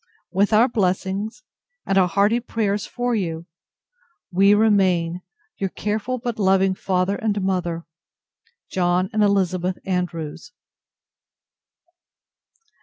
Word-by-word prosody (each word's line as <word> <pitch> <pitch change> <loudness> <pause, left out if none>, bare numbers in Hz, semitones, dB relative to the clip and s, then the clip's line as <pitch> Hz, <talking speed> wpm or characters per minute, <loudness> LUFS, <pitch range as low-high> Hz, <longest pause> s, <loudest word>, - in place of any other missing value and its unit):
With 200 +3 +2
our 220 +3 +5
blessings, 205 +2 -1 0.4
and 195 - 0
our 190 -2 +5
hearty 205 +6 +2
prayers 210 -4 -2
for 245 0 -2
you, 170 -6 -2 0.9
we 195 +3 +5
remain, 185 -5 +2 0.4
Your 195 - -1
careful, 215 +6 -2
but 240 -2 -4
loving 190 -1 +3
Father 185 +1 0
and 215 -4 -1
Mother, 175 -3 -2 0.9
JOHN 180 +2 +1
AND 215 - +1
ELIZABETH 185 -3 +1
ANDREWS. 180 +2 -4
195 Hz, 105 wpm, -22 LUFS, 180-215 Hz, 0.9 s, our